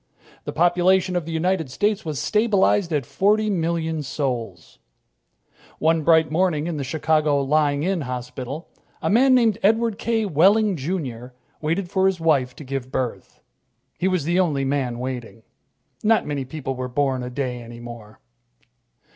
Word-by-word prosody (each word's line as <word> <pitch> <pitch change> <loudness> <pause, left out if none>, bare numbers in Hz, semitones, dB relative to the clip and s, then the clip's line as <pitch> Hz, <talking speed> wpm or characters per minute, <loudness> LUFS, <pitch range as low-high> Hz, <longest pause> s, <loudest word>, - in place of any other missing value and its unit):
The - - -3
population 180 +2 +2
of 175 -3 -1
the - - -4
United 165 -2 0
States 205 +9 0
was 155 -4 -4
stabilized 205 - +2
at 145 -5 0
forty 210 - +1
million 165 -3 -1
souls. 125 - -4 1.0
One 160 +1 +2
bright 160 0 +4
morning 160 -2 +1
in 170 -2 -3
the 140 - -3
Chicago 155 +1 +1
Lying 145 0 +1
in 185 -1 0
Hospital, 125 +3 -6 0.3
a - - -1
man 255 +4 +5
named 230 -5 +3
Edward 225 +1 +2
K. 225 -2 0
Wehling, 200 +4 +4
Jr., 130 -6 -4 0.3
waited 170 +4 -1
for 190 0 +3
his 190 -2 0
wife 140 -6 +1
to - - -10
give 130 -1 -5
birth. 125 -3 -4 0.6
He 185 - +1
was 185 -5 0
the 175 +4 +1
only 150 -7 +1
man 135 -3 -1
waiting. 125 -3 -6 0.6
Not 220 +1 +3
many 145 -3 -3
people 135 0 -5
were 130 0 -4
born 130 0 0
a 125 - -5
day 125 -2 -3
any 120 0 -10
more. 120 -3 -11
155 Hz, 155 wpm, -23 LUFS, 130-185 Hz, 1.0 s, man